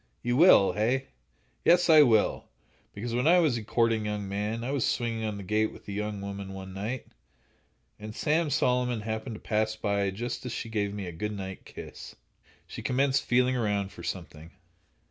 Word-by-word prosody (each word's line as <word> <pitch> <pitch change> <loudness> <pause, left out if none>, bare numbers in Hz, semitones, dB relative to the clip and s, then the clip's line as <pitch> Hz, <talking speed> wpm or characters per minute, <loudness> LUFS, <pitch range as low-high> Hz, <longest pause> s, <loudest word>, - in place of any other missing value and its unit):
"You 120 0 0
will, 135 - +7
hey?" 125 +6 0 0.5
"Yes, 175 +1 +5
I 155 -2 +8
will; 115 -7 +3 0.5
because 115 +3 -5
when 125 +5 +1
I 175 +2 +7
was 155 -8 +3
a 115 - -4
courting 115 0 +1
young 105 -1 -3
man, 105 +4 -3
I 130 - -2
was 140 -4 0
swinging 115 -2 -1
on 105 -1 -3
the 100 - -7
gate 110 +3 +1
with - - -15
a - - -5
young 105 0 -3
woman, 100 -1 -6
one 95 0 -8
night, 110 +6 -4 0.9
and 105 0 -8
Sam 155 +1 +1
Solomon 125 -4 +1
happened 110 +2 -4
to - - -9
pass 110 0 0
by 100 -2 0
just 115 +6 -4
as 125 - -5
she 115 - -5
gave 105 -2 -1
me 100 -1 -5
a 90 - -5
good 105 +5 -4
night 95 -1 -7
kiss." - - -10 0.5
She - - -8
commenced 135 +1 +2
feeling 125 +1 +3
around 105 -4 -1
for - - -11
something. 80 +2 -6
110 Hz, 190 wpm, -28 LUFS, 100-125 Hz, 0.9 s, I